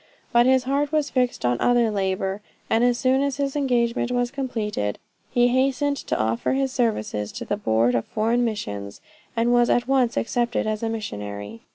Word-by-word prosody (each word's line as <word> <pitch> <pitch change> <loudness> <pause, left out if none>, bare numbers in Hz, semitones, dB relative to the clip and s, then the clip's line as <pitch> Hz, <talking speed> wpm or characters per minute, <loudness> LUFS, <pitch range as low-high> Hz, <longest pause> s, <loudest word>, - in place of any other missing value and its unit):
But 240 0 +5
his 260 -1 +4
heart 280 +2 0
was 305 -2 0
fixed 250 - 0
on 120 0 +1
other 240 -2 +3
labor, 195 0 -1 0.3
and 225 +1 +3
as 245 -1 +3
soon 265 +1 +2
as 280 -1 -1
his 280 0 -2
engagement 245 -4 +1
was 245 -1 0
completed, 220 - -3 0.3
he 245 0 +3
hastened 275 +3 +1
to - - -3
offer 110 - 0
his 270 0 0
services 110 - -1
to - - -6
the - - -1
Board 115 - +1
of 115 -1 0
Foreign 230 +3 0
Missions, 100 - -4 0.4
and 235 +1 +2
was 240 0 +4
at 245 0 +2
once 260 -3 +2
accepted 240 +1 0
as 215 -1 -2
a 225 - -1
missionary. 105 - -6
240 Hz, 185 wpm, -24 LUFS, 195-260 Hz, 0.4 s, But